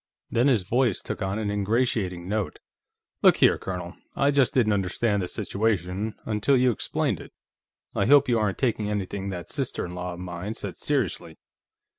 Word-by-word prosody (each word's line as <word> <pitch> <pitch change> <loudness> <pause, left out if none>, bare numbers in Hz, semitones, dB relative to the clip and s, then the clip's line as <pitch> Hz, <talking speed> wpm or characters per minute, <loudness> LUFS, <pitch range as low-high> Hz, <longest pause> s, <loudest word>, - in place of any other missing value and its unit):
Then 120 +4 +3
his 120 -8 +3
voice 120 +2 +1
took - - -5
on 95 +2 -1
an 105 -2 -1
ingratiating 100 -4 0
note. 105 -1 -2 0.6
"Look - - +6
here, - - +4
Colonel; 90 -2 -5 0.2
I 140 +1 +3
just 135 -5 +3
didn't 110 -5 +3
understand 100 +2 0
the 90 - -2
situation, 105 +1 -1
until 110 +6 +2
you 125 0 +4
explained 110 - -1
it. - - -12 0.6
I - - +1
hope 145 +1 +6
you 120 -2 +2
aren't 105 -3 0
taking 110 -5 0
anything 100 -1 -3
that 90 -3 -6
sister - - -2
in 85 - -7
law 90 0 -4
of - - -11
mine 90 +4 -5
said - - -5
seriously. 105 - -1
105 Hz, 175 wpm, -26 LUFS, 90-120 Hz, 0.6 s, Look